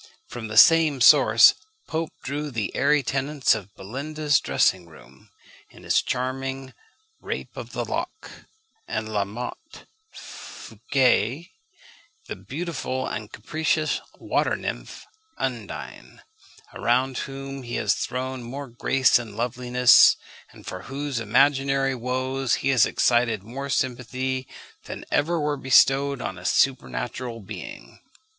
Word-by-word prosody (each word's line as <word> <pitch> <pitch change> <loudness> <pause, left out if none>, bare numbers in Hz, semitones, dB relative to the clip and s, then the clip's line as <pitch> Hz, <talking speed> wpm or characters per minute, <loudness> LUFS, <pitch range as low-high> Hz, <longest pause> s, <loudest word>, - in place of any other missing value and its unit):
From 120 -2 -7
the 110 0 -5
same 160 -2 +6
source 125 - +7 0.3
Pope 160 0 -2
drew 145 +2 -3
the 110 -7 -4
airy 150 -1 +3
tenants 135 +2 +1
of 100 -3 -7
Belinda's 145 +8 -1
dressing 90 -2 +1
room, 65 -5 -18 0.4
in - - -17
his - - +2
charming 130 +1 -4 0.5
Rape - - -6
of - - -8
the - - -2
Lock; 435 - -5 0.6
and 110 -1 -3
La 100 -1 +1
Motte 125 - -8 0.3
Fouqué, 130 - -2 0.7
the - - -6
beautiful 140 -4 -4
and 105 -1 -5
capricious 155 +6 -1 0.2
water - - 0
nymph - - -6 0.3
Undine, - - -6 0.5
around 125 +2 0
whom 135 0 -6
he 120 -1 -6
has - - +1
thrown 130 +1 -4
more 135 +3 -7
grace 130 +2 +3
and 110 -3 -9
loveliness, 125 +1 +5 0.4
and - - -16
for 95 - -6
whose 140 -2 -3
imaginary 135 +4 +2
woes 130 +1 -1
he - - +3
has 130 -5 +4
excited 120 -4 +1
more 135 +6 -7
sympathy, 130 0 -2 0.4
than - - -8
ever 165 +3 +1
were 150 -1 -1
bestowed 135 0 +3
on 95 - -5
a - - -13
supernatural 115 - -1
being. 110 +1 -10
130 Hz, 125 wpm, -24 LUFS, 115-140 Hz, 0.7 s, source